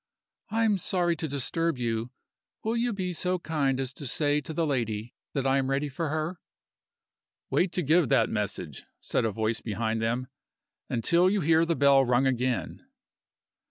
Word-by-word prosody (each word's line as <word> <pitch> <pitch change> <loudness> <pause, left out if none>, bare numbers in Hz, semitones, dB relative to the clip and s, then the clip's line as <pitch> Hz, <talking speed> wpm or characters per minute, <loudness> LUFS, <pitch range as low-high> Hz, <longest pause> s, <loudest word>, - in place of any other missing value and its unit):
"I 225 +2 +1
am 210 -3 +2
sorry 175 -1 +1
to 160 - -3
disturb 150 +3 -1
you. 115 -1 -2 0.5
Will 225 +2 0
you 240 +1 +1
be 185 -4 -2
so 180 +2 0
kind 150 -6 0
as 135 0 -2
to 140 - -6
say 145 +3 +1
to 150 - -7
the 165 +1 0
lady 115 -5 -2 0.2
that 135 -2 -1
I 135 +1 +3
am 135 0 -1
ready 140 +2 0
for 155 +3 -3
her?" 155 +3 -2 1.1
"Wait 180 -1 +2
to 180 - 0
give 160 +2 +3
that 130 -5 +4
message," 100 - -3 0.2
said - - -1
a 110 - +1
voice 110 +2 -1
behind 110 0 -2
them, 120 +3 0 0.6
"until 170 +10 +3
you 200 0 +1
hear 165 +1 +4
the 165 0 0
bell 140 -2 +5
rung 125 +1 +2
again." 125 - -1
140 Hz, 175 wpm, -28 LUFS, 120-170 Hz, 1.1 s, bell